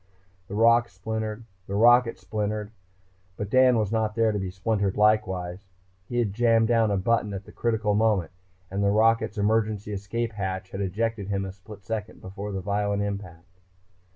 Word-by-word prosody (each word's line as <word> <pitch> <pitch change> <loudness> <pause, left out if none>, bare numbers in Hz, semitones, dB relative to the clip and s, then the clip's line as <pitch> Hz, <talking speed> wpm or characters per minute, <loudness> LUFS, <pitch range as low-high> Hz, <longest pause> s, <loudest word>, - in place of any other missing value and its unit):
The 100 - -6
rock 115 +2 +4
splintered. 110 +3 -4 0.2
The 100 - -3
rocket 120 +2 +5
splintered. 105 0 -3 0.7
But 105 0 -5
Dan 130 -1 +5
was 105 -2 0
not 110 -1 0
there 115 -1 +3
to 105 - -2
be 95 -1 -3
splintered 100 +1 -1
likewise. 95 -3 +1 0.4
He 120 - -3
had 110 -5 +1
jammed 115 0 +3
down 115 -2 +3
a 100 - +1
button, 105 0 0
at 95 +1 -7
the - - -13
critical 110 -3 0
moment, 105 -5 +2 0.4
and 100 +1 -1
the 100 - +3
rocket's 110 +1 +2
emergency 105 0 0
escape 115 +4 -3
hatch 95 -2 -4
had 95 - -4
ejected 105 +2 -2
him 100 -1 -1
a 95 - -5
split 100 +1 -13
second 110 +2 -5
before 100 +2 -7
the 95 -1 -3
violent 100 +1 -1
impact. 90 -3 -7
105 Hz, 175 wpm, -26 LUFS, 100-115 Hz, 0.7 s, rocket